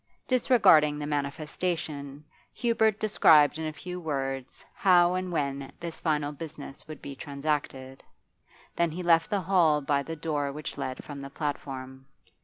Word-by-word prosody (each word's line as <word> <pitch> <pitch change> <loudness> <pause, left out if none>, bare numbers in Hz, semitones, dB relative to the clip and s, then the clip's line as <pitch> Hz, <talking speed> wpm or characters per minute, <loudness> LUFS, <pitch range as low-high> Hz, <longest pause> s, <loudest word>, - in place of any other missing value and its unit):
Disregarding 195 - +5
the 150 - -4
manifestation, 150 0 -3 0.3
Hubert 220 -3 +2
described 155 -8 +5
in 160 - -2
a - - -3
few 180 +3 -7
words 135 -5 -4
how 180 -2 +4
and 185 0 -2
when 140 -4 -2
this 170 -1 -6
final 150 -3 0
business 145 -2 -9
would 155 - -10
be 140 - -7
transacted; 140 -2 -4 0.7
then 170 -1 +2
he 175 +3 -5
left 165 -1 +4
the 205 -2 0
hall 165 -5 +3
by 140 0 0
the 165 +3 -6
door 150 -3 -2
which 150 0 -6
led 130 0 -5
from 145 -2 -8
the 140 - -7
platform. 135 -2 -5
150 Hz, 150 wpm, -28 LUFS, 140-170 Hz, 0.7 s, Disregarding